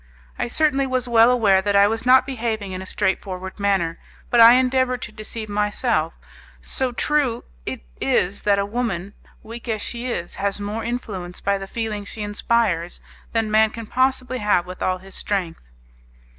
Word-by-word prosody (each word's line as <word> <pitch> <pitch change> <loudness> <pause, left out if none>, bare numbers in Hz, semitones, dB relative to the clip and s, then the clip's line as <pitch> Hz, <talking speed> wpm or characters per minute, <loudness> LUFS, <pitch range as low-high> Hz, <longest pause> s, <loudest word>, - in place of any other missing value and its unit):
I - - 0
certainly 275 +1 +1
was 255 -1 -1
well 230 0 +6
aware 210 -6 +4
that 200 +1 0
I 200 0 +7
was 225 +3 -1
not 260 0 +7
behaving 225 -6 -3
in 185 0 -5
a 190 - -8
straightforward 190 0 -2
manner, 190 -5 0 0.3
but 240 - +4
I 230 +1 +10
endeavoured 255 0 +2
to 210 - -6
deceive 215 +1 -6
myself, 205 -4 0 0.5
so 260 -1 -1
true 265 -2 0 0.2
it - - -4 0.4
is 195 +3 -3
that 200 -1 +3
a 200 - +1
woman, 205 -4 -3 0.3
weak 230 +2 -9
as 215 -2 -1
she 240 +1 -4
is, 175 -8 -4
has 200 0 -1
more 210 +2 -4
influence 205 -7 -4
by 200 0 0
the 195 - -7
feeling 215 -1 -3
she 210 +1 -7
inspires 205 -4 0 0.3
than 225 -2 0
man 220 0 +5
can 230 +1 -8
possibly 255 +1 0
have 205 -4 +2
with 185 0 -9
all 185 0 +1
his 190 +1 -13
strength. 190 -5 -3
215 Hz, 175 wpm, -22 LUFS, 195-240 Hz, 0.5 s, I